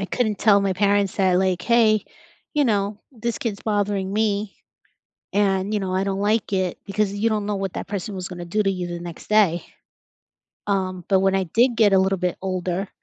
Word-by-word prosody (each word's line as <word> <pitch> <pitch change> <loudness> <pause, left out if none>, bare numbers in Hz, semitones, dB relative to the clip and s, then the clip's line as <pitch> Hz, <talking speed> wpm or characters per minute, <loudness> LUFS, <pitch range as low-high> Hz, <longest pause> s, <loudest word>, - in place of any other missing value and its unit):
I - - -1
couldn't 215 -2 -1
tell 205 -2 +5
my 195 -1 +1
parents 200 0 +1
that, 185 -2 +3
like, 185 -2 0
"Hey, 220 -3 +3 0.5
you 295 -1 +3
know, 205 -3 0
this 235 -2 -4
kid's 210 -4 -3
bothering 205 -2 -1
me." 210 -1 -1 0.8
And, 200 0 +1
you 210 - +1
know, 190 -2 -3
I 190 +1 +1
don't 195 0 -2
like 210 0 0
it 185 -2 0
because 200 0 -1
you 205 +3 0
don't 210 -2 -1
know 205 0 -1
what 195 -2 -3
that - - -5
person 200 +1 -4
was 185 -1 -5
gonna 175 -1 -7
do 210 +5 0
to 195 - +2
you 180 -2 -4
the 175 0 -5
next 170 -1 -9
day. 200 -6 +3 1.0
Um, 185 -3 -1
but 190 -2 +4
when 195 0 +2
I 190 0 +1
did 235 +8 +2
get 210 -3 +4
a 190 - +6
little 190 0 +1
bit 180 0 -1
older 185 0 -2
195 Hz, 210 wpm, -23 LUFS, 185-210 Hz, 1.0 s, a